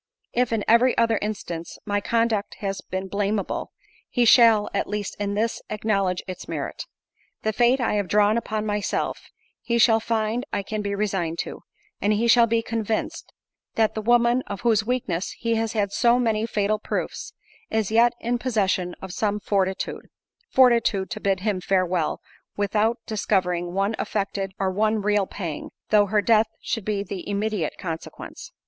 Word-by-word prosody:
If, 245 0 +1
in 220 -2 0
every 240 +3 +4
other 230 -2 +3
instance, 175 -6 -5
my 205 0 0
conduct 230 -2 0
has 195 -1 -4
been 190 +1 -5
blameable, 200 +1 -2 0.4
he 245 -2 +2
shall, 225 -3 +6
at - - 0
least 205 -1 -3
in 200 0 -1
this, 225 +2 -1
acknowledge 200 -4 0
its 185 -1 -7
merit. - - -4 0.6
The 220 - 0
fate 245 +4 +3
I 240 - 0
have 200 -2 -1
drawn 210 +2 +3
upon 215 -2 -2
myself, 210 -1 -2 0.3
he 235 - 0
shall 225 -1 +5
find 225 +1 -1
I 200 - -1
can 215 +2 -3
be 200 -1 -2
resigned 190 -5 -1
to; - - -8 0.4
and 205 +1 +2
he 225 +3 +1
shall 235 0 +6
be 230 0 +1
convinced, 225 -1 -3 0.4
that 220 -1 +2
the 220 - -3
woman, 240 +2 +3
of 200 - -5
whose 220 -3 +3
weakness 210 -7 -2
he 230 -1 -1
has 225 -1 -1
had 205 -3 0
so 240 +3 +3
many 225 -2 +1
fatal 210 -1 0
proofs, - - -4 0.4
is 220 -2 0
yet 235 +2 +5
in 240 +1 -1
possession 195 -7 0
of 190 -2 -6
some 210 0 0
fortitude—fortitude, 210 - 0
to 220 - -4
bid 195 -3 0
him 200 -3 -1
farewell, 185 -3 0 0.4
without 210 +3 +1
discovering 180 -5 0
one 200 +3 0
affected 195 -2 -2
or 190 -1 0
one 215 +2 +1
real 205 -2 +2
pang, 170 -7 -5 0.2
though 205 -1 +5
her 210 +1 +2
death 220 0 +4
should 225 -6 -3
be 205 -2 -1
the 195 0 -6
immediate 205 -4 -1
consequence." 165 -3 -7
210 Hz, 165 wpm, -24 LUFS, 195-225 Hz, 0.6 s, shall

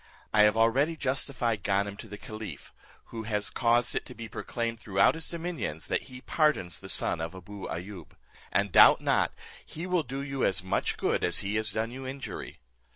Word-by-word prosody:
I 105 - +6
have 105 +1 +3
already 135 +8 +3
justified 130 -5 -1
Ganem 100 +1 0
to 110 - -9
the 105 0 -8
caliph; 110 0 -8 0.4
who 115 - -4
has 105 -1 0
caused 120 0 +2
it - - -1
to - - -10
be 115 0 -7
proclaimed 115 0 -3
throughout 100 -4 +3
his 160 0 -5
dominions, 165 - -4
that - - -1
he 125 0 -10
pardons 150 - +1
the - - -10
son - - +2
of 80 +3 -4
Abou 95 +2 -8
Ayoub; 90 -1 -7 0.4
and - - +1
doubt - - +8
not - - +2 0.3
he 165 +3 -7
will 180 -2 +2
do 135 0 -5
you 135 -1 -3
as 90 -1 +3
much 95 +1 -1
good - - 0
as 85 - +1
he 100 - -1
has 110 0 0
done 110 +1 -1
you 130 +1 -7
injury. 135 0 -6
115 Hz, 195 wpm, -29 LUFS, 100-135 Hz, 0.4 s, doubt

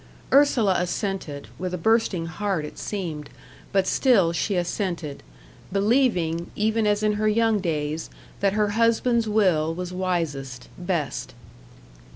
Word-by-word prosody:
Ursula 245 -9 +4
assented 180 -5 -3
with 180 0 -2
a - - -4
bursting 205 -3 +1
heart 175 -1 -2
it - - -9
seemed 165 -8 -4 0.4
but 195 -1 +2
still 200 -8 +3
she 180 +5 -1
assented, 175 -4 -2 0.5
believing, 195 -6 +1
even 220 +1 +1
as 205 0 +1
in 210 0 +3
her 215 - +2
young 225 0 +3
days, 155 -3 -2 0.3
that 195 -1 +2
her 210 0 +2
husband's 230 +1 +2
will 175 -7 +2
was 180 0 -5
wisest, 150 -9 -3
best. 150 -10 -3
185 Hz, 130 wpm, -24 LUFS, 165-215 Hz, 0.5 s, Ursula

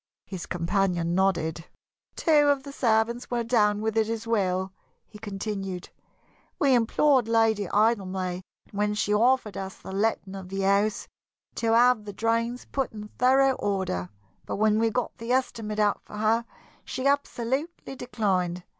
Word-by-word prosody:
His 190 -3 -7
companion 175 -1 0
nodded. 170 -4 0 0.5
"Two 300 -3 +4
of 285 -2 +2
the 280 - -8
servants 235 -2 +1
were 240 -1 -1
down 210 -3 +2
with 220 0 -1
it 220 -1 +2
as 225 0 -3
well," 190 -4 0 0.3
he 210 - -14
continued. 195 -3 -5 0.7
"We 275 -2 +3
implored 250 +2 +3
Lady 225 -3 +2
Idlemay, 190 -4 0 0.3
when 210 +1 0
she 210 0 0
offered 235 0 +2
us 190 0 -6
the - - -10
letting 200 -1 -1
of 190 -2 -8
the 195 +1 -3
house, 200 +2 +1 0.5
to 225 -1 +1
have 240 -1 +4
the 205 - -7
drains 230 +3 -1
put 270 -3 -2
in 210 -1 -8
thorough 265 +2 +4
order, 190 - -2 0.4
but - - -3
when 215 +1 +2
we 225 0 +3
got 250 +2 -2
the 230 +2 -2
estimate 225 -5 -1
out 210 -1 +2
for 210 - -10
her 225 +2 +1 0.4
she 260 - -5
absolutely 280 +2 -1
declined. 185 -8 -1
215 Hz, 155 wpm, -26 LUFS, 195-235 Hz, 0.7 s, Two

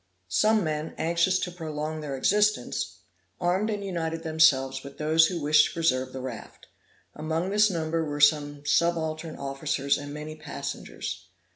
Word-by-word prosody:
Some 215 - +3
men 155 0 -3
anxious 170 +3 +2
to 180 - -3
prolong 155 -2 -4
their 145 -3 -4
existence, 210 0 +1 0.4
armed 185 +5 +1
and 205 -2 -3
united 165 -3 -3
themselves 140 -5 +3
with 140 0 -10
those 160 +2 +4
who 175 -1 -3
wished 150 0 +5
to - - -9
preserve 130 -6 +1
the 130 - -6
raft; 125 -3 -8 0.5
among 160 +4 -2
this 210 +1 +4
number 165 -2 -1
were 145 -1 -4
some 145 -1 +3
subaltern 160 +1 0
officers 140 0 -1
and 145 0 -7
many 150 +1 -7
passengers. 155 - -6
155 Hz, 150 wpm, -27 LUFS, 145-170 Hz, 0.5 s, wished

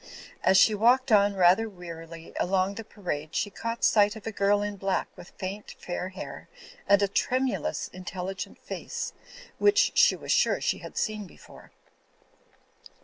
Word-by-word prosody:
As 190 - +5
she 215 - +6
walked 245 +5 +3
on 205 -1 +5
rather 190 +5 +4
wearily 165 -3 -10
along 190 +1 +1
the 225 - -7
parade 165 -8 -5
she 205 - 0
caught 230 +4 -5
sight 210 0 +4
of 220 - -11
a 225 - -3
girl 205 0 +2
in 205 0 -3
black 195 -1 -1
with 175 - -12
faint 195 +2 -6
fair 180 +1 -4
hair 190 +1 -9 0.4
and 200 0 +5
a - - +3
tremulous, 260 +8 -1
intelligent 185 +1 -6
face - - -5 0.5
which 410 0 +4
she - - +5
was - - -5
sure - - +3
she - - -1
had - - -10
seen 215 -2 -2
before. - - -16
200 Hz, 155 wpm, -27 LUFS, 185-220 Hz, 0.5 s, she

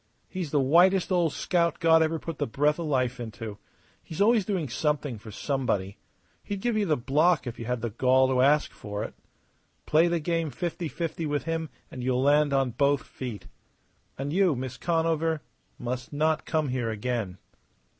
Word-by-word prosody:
He's 180 -5 -4
the 145 - +2
whitest 175 +8 +4
old 175 -4 +2
scout 170 0 0
God 165 -1 +5
ever 160 +1 +1
put 165 -1 -7
the - - 0
breath 145 +6 +1
of 165 - -3
life 130 -3 0
into. 110 -2 -7 0.4
He's 160 - -9
always 215 0 +4
doing 185 -7 -1
something 145 -1 -1
for 110 +1 -11
somebody. 110 -5 -2 0.5
He'd 200 -1 -4
give 240 +2 0
you 210 -2 +1
the 155 -3 +2
block 150 +7 +2
if 120 -1 -6
you 115 - -5
had 125 0 -2
the 120 -1 -2
gall 130 +3 +3
to 130 -1 +2
ask 145 +3 +3
for 105 0 -5
it. - - -6 0.7
Play 160 +3 +4
the 170 0 +1
game 165 0 -1
fifty 170 +5 -3
fifty 165 0 -3
with 145 0 -1
him 165 -1 -2 0.2
and 125 - -6
you'll 130 0 +1
land 145 +1 +4
on 135 -2 +2
both 140 +3 +2
feet. 120 -6 -7 0.7
And 140 +2 -3
you, 185 -4 +3
Miss 130 0 -5
Conover, 165 -1 0 0.3
must 125 +2 -4
not 155 +2 0
come 155 -3 0
here 125 -3 -1
again." 110 -4 -3
145 Hz, 185 wpm, -27 LUFS, 125-165 Hz, 0.7 s, God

